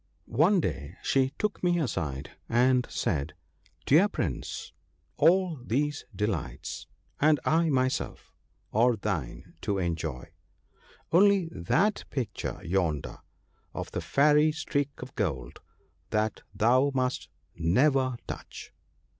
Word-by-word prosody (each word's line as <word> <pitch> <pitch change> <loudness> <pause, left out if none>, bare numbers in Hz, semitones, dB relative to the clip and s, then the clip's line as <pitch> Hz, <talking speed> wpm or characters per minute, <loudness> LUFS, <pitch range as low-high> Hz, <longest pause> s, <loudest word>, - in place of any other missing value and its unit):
One 170 - +3
day 75 - -3
she 135 -1 +2
took 210 -1 -1
me 175 -1 +3
aside, 75 - -3 0.2
and 125 +1 +3
said, 75 -2 -2 0.2
' 90 -1 -35
Dear 165 +9 +6
Prince! - - -4 0.4
all 170 -1 +3
these 145 +5 -1
delights, 100 -4 -3 0.3
and 150 0 +4
I 165 +1 +3
myself, 130 -2 -1 0.4
are 120 +2 +4
thine 100 - -4
to 100 -2 -1
enjoy; 85 -5 -3 0.8
only 195 -1 +5
that 180 - +1
picture 120 -7 -4
yonder, 85 -5 -1 0.6
of - - -5
the - - -3
Fairy 150 +2 +4
Streak 150 -2 -1
o' 130 - -8
Gold, 70 - -3 0.5
that 110 0 0
thou 125 +5 +3
must 130 -1 -1 0.3
never 130 - +2
touch - - -8
130 Hz, 115 wpm, -28 LUFS, 95-150 Hz, 0.8 s, Dear